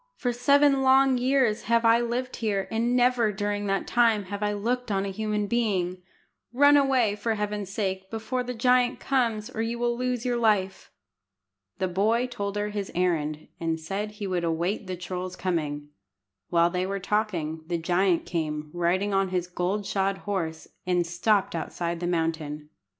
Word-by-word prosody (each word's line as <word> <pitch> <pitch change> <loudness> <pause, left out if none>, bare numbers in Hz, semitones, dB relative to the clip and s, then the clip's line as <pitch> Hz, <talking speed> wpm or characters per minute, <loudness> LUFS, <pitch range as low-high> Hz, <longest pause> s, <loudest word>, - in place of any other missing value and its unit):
For 245 -2 -1
seven 280 +2 +4
long 265 -1 +5
years 255 -4 +2
have 230 0 +2
I 230 +1 +6
lived 245 +2 -3
here, 200 -4 -1
and 235 +2 +1
never 245 -3 +3
during 205 0 -2
that 195 0 0
time 230 -3 +3
have 200 +2 -6
I 210 0 +1
looked 240 +4 -2
on 195 0 0
a 195 - -3
human 210 +1 -1
being. 195 -5 0 0.5
Run 285 +4 +6
away, 260 -7 +3
for 220 +2 -1
Heaven's 210 -2 -3
sake, 190 -2 -3
before 225 +4 -3
the 250 0 -5
giant 250 +1 +3
comes, 230 -5 0
or 225 - -3
you 230 +1 -2
will 240 0 0
lose 250 0 -2
your 245 -1 +1
life." 210 -5 +1 0.9
The 190 -1 0
boy 215 +7 +1
told 200 -5 -4
her 205 0 -1
his 205 -2 -4
errand, 155 -4 0
and 165 -1 -1
said 200 +6 -4
he 210 -1 -6
would 180 -3 -1
await 170 +5 -1
the 185 - -3
troll's 185 0 -5
coming. 150 -6 -2 0.6
While 170 0 +3
they 180 +1 -1
were 195 0 -2
talking, 180 -6 -1
the 170 0 -1
giant 175 +1 +1
came, 150 -3 -3
riding 180 +4 0
on 195 -1 +2
his 180 -1 -1
gold 180 +3 -2
shod 195 0 0
horse, 165 -6 -3 0.2
and 180 -1 +1
stopped 190 +4 +1
outside 170 +1 -3
the 175 - -2
mountain. 160 -3 -2
205 Hz, 175 wpm, -26 LUFS, 180-235 Hz, 0.9 s, I